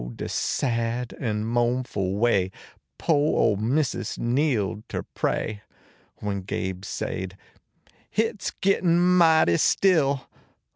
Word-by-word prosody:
de - - -5
sad 120 -1 -1
en 105 -4 -2
moanful 120 -5 0
way, 105 -5 +2 0.5
po 165 - +1
ole 145 -7 +3
missus 125 +7 -1
kneeled 120 -5 0
ter - - -3
pray, 105 -1 -2 0.5
When 100 -2 -3
(kibe 95 -1 -4
sade: 95 0 -4 0.4
" - - -43 0.2
Hit 220 -2 -1
s - - -2
gittin 180 -3 +3
mighty 165 - +5
still." 145 -8 +2
120 Hz, 110 wpm, -25 LUFS, 105-155 Hz, 0.5 s, mighty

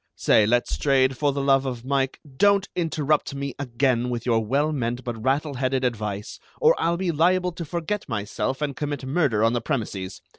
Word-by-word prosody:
"Say, 105 -2 +4
Letstrayed, 130 +3 +2
for 145 +2 +1
the 140 0 -2
love 135 -1 +3
of 125 -2 -5
Mike, 135 -1 0 0.2
don't 200 +5 +3
interrupt 155 -4 0
me 140 -1 -4
again 125 -2 0
with 120 -1 -3
your 115 -2 +2
well 140 +7 +1
meant 120 -3 -2
but 115 -3 -5
rattle 140 +3 0
headed 130 0 -1
advice, 105 -4 -3 0.2
or 470 0 +6
I'll 170 +1 +1
be 180 -1 0
liable 180 +3 +2
to 170 0 -6
forget 170 +6 -3
myself 110 +6 -2
and 140 -2 -2
commit 145 -1 -4
murder 130 -7 +1
on 115 +1 +3
the 120 - 0
premises. 100 -8 -3
135 Hz, 185 wpm, -24 LUFS, 120-150 Hz, 0.2 s, or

